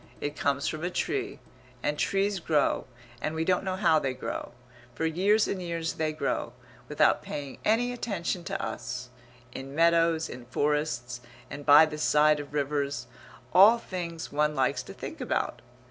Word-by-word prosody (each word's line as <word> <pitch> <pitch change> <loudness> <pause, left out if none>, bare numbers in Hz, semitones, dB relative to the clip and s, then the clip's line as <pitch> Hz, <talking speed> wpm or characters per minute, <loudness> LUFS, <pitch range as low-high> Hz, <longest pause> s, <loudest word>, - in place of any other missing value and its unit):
It 145 0 -3
comes 140 0 0
from 155 +1 -3
a 175 - 0
tree; 395 - -2 0.5
and 150 - 0
trees 195 0 +1
grow, 155 -6 +1 0.3
and 155 - -2
we 160 0 -1
don't 185 +1 +2
know 190 -1 -2
how 170 -5 +4
they 135 -3 -2
grow. 130 - -5 0.4
For 160 - -1
years 195 +7 +3
and 190 - -3
years 170 -2 -3
they 155 -1 -1
grow, 155 - -2 0.4
without - - +3
paying 140 -2 -6
any 235 +3 +2
attention 195 -7 -3
to 195 0 -3
us, 125 0 -5 0.4
in 135 +2 -8
meadows, 165 0 +3
in 125 -1 -9
forests, 125 -3 -1 0.3
and 145 +1 -8
by 150 +2 +9
the 150 -1 -6
side 150 0 +4
of 145 -1 -8
rivers 145 -1 -1 0.5
all 200 +6 +8
things 175 -7 -6
one 150 +1 +1
likes 130 -2 +1
to - - -10
think - - -7
about. - - -2
160 Hz, 165 wpm, -28 LUFS, 145-185 Hz, 0.5 s, by